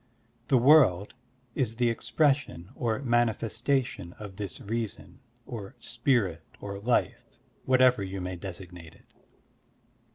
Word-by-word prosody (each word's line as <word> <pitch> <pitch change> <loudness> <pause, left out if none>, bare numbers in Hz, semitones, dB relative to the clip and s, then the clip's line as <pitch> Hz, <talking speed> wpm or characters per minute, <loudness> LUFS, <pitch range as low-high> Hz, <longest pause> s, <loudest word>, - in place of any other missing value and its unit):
The 135 - +4
world 120 - +5 0.4
is 115 -4 -1
the 120 0 +2
expression 135 - 0
or 120 0 -2
manifestation 120 -3 0
of 105 -3 -10
this 100 -5 -5
reason 115 +2 -5 0.3
or 115 -1 -8
spirit 120 - 0 0.2
or 100 -1 -6
life, 120 +4 0 0.4
whatever 130 -3 +4
you 95 0 -4
may 90 0 -4
designate 90 -3 -9
it. - - -23
115 Hz, 110 wpm, -28 LUFS, 95-125 Hz, 0.4 s, world